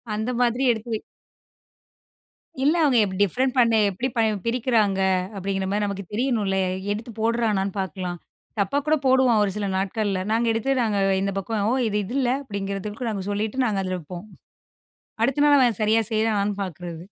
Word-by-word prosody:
அந்த 220 +3 -2
மாதிரி 245 +2 +1
எடுத்து 225 +1 -7 1.7
இல்ல, 300 +4 +4
அவங்க 220 -9 +3
டிஃப்ரெண்ட் 255 - +1
பண்ண, 230 -2 +4 0.2
எப்டி 235 +7 -2
ப - - 0 0.3
பிரிக்கிறாங்க? 225 -5 +1 0.4
அப்டிங்கிற 195 0 -2
மாரி 210 +1 0
நமக்கு 200 -1 -4
தெரியணும்ல. 215 -5 0 0.3
எடுத்து 230 +3 -4
போடுறானான்னு 220 -4 0
பார்க்கலாம், 180 -1 -4 0.4
தப்பா 200 +8 +1
கூட 310 - +4
போடுவான் 255 -4 +4
ஒரு 195 - 0
சில 205 -1 -2
நாட்கள்ல. 195 -1 -1
நாங்க 230 +1 +1
எடுத்து, 250 +5 0
நாங்க 215 -3 0 0.2
இந்த 195 0 -1
பக்கம், 205 +1 -2
"ஓ! - - +2
இது 210 0 0
இது 240 +7 -6
இல்ல" 245 -2 +1
அப்டிங்கிறதுக்கு 205 +1 -4
நாங்க 195 -3 -4
சொல்லிட்டு 215 +5 -1
நாங்க 200 -4 0
அதில 185 -1 -2
வைப்போம். 175 +4 -9 1.0
அடுத்த 275 +4 +2
நாள் 290 -1 +6
அவன் 240 -5 +2
சரியா 220 +1 +3
செய்றானான்னு 210 -2 +1
பார்க்குறது. 175 -2 -7
210 Hz, 155 wpm, -24 LUFS, 195-235 Hz, 1.7 s, நாள்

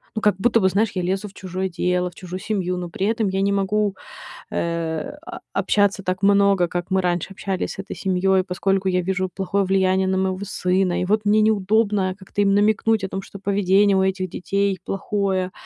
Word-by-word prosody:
ну, 220 - -2
как 210 -2 +3
будто 230 +2 +3
бы, 190 - +4
знаешь, 210 +4 +1
я 185 - 0
лезу 190 +3 -1
в - - -20
чужое 185 0 -4
дело, 180 +1 0
в - - -23
чужую 185 0 -7
семью, 185 -4 -1
но 175 -1 -5
при 190 +3 -2
этом 220 -1 0
я 190 0 -1
не 200 - +2
могу, 200 0 0 0.6
э, 165 -2 -2
о - - -8
общаться 200 -1 +1
так 185 +1 -2
много, 200 -3 +4
как 175 0 -4
мы 190 - +3
раньше 175 0 -1
общались 195 -1 -3
с - - -12
этой 195 - -6
семьёй, 190 0 +2
поскольку 195 +1 0
я 180 0 +1
вижу 185 +1 -1
плохое 195 +1 0
влияние 190 0 +2
на 190 0 +1
моего 190 0 0
сына, 185 -2 0
и 180 - 0
вот 210 +2 +1
мне 215 +1 +4
неудобно 210 -2 +2
как-то 195 +2 -3
им 195 -1 +3
намекнуть 215 +1 +2
о 190 - -2
том, 195 - -4
что 195 +1 -11
поведение 200 0 +3
у 190 - +3
этих 190 -1 -1
детей 195 +2 -1
плохое. 195 -2 -1
190 Hz, 205 wpm, -22 LUFS, 185-200 Hz, 0.6 s, бы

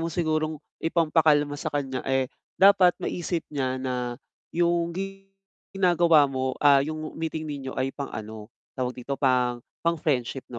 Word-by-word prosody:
mong 165 +1 -2
sigurong 155 -2 0 0.3
ipampakalma 155 -3 +3
sa 145 - -4
kanya, 135 -3 -2
eh, 135 -1 +2 0.3
dapat 190 -2 +6
maisip 175 -1 -3
niya 130 -2 -1
na 125 -2 -3 0.3
yung 170 0 +1 0.8
ginagawa 170 -5 +4
mo 130 -1 -2
ah, 140 -2 +6
yung 155 +1 -5
meeting 160 -1 -4
ninyo 140 -3 -5
ay 135 +1 -1
pang 140 -1 -5
ano, 110 0 -8 0.2
tawag 125 -1 -3
dito 140 +3 -3
pang 125 -3 +1 0.2
pang-friendship 145 -6 0
'no, 120 - -6
145 Hz, 140 wpm, -26 LUFS, 130-165 Hz, 0.8 s, dapat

